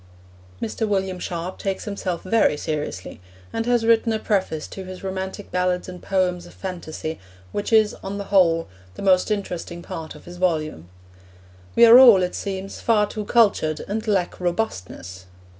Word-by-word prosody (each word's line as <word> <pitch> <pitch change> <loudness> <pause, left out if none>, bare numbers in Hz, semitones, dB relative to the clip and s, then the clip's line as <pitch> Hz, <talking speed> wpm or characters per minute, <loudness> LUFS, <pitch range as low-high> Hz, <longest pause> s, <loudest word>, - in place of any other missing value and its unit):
Mr. 220 - -2
William 190 -2 -1
Sharp 175 +1 -5
takes 195 -1 -3
himself 195 -4 -3
very 190 -6 +2
seriously 145 - -4 0.3
and 225 - -2
has 240 -2 +2
written 230 0 +4
a 220 - +1
preface 190 -8 -1
to 190 - -8
his 185 0 -9
Romantic 190 +1 -5
Ballads 180 0 0
and 180 -1 -9
Poems 180 -2 0
of - - -15
Phantasy, 160 -4 -5 0.3
which 205 +2 -3
is, 220 -2 +5
on 195 +1 -4
the 200 - -4
whole, 165 -4 +4 0.3
the - - -7
most 185 0 +4
interesting 180 -4 -4
part 165 -4 -7
of - - -14
his 175 0 -10
volume. 155 - -1 0.9
We 235 - +8
are 235 +2 +10
all, 230 -8 +8
it 180 - -2
seems, 195 0 -5
far 215 -3 +3
too 210 0 -6
cultured, 200 -9 +2
and 220 +3 -3
lack 190 -4 0
robustness. 95 - -4
190 Hz, 165 wpm, -23 LUFS, 175-210 Hz, 0.9 s, are